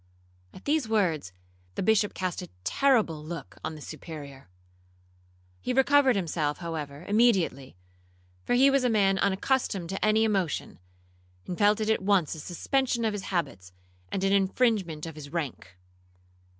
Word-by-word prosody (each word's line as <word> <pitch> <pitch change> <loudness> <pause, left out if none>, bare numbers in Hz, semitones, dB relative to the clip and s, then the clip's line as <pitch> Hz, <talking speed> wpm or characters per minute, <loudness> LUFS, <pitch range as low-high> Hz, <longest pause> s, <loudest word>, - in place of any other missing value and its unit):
At 185 - -14
these 290 -5 +1
words, 170 - +1 0.4
the - - -2
Bishop 210 0 +2
cast 185 -1 -3
a 180 - -9
terrible 215 - +2
look 165 -1 -8
on 155 0 -4
the 150 - -11
Superior. 145 - -9 1.1
He 250 - -2
recovered 270 -1 +4
himself, 160 -5 -1
however, 160 -3 -6
immediately, 200 - +2 0.7
for - - +1
he 270 +2 +6
was 275 -1 +2
a 250 - +3
man 195 -4 +3
unaccustomed 195 -2 0
to 195 - -4
any 215 +1 +4
emotion, 195 -7 -1 0.7
and 180 - -4
felt 205 +2 +3
it 215 0 -1
at 220 - +1
once 190 -5 +2
a 160 - -8
suspension 235 - -1
of 215 - 0
his 205 -2 -5
habits, 135 - -3 0.4
and 190 - -2
an 195 0 +2
infringement 195 -5 +1
of 165 - -7
his 150 -2 -10
rank. 135 - -5
190 Hz, 150 wpm, -27 LUFS, 155-220 Hz, 1.1 s, he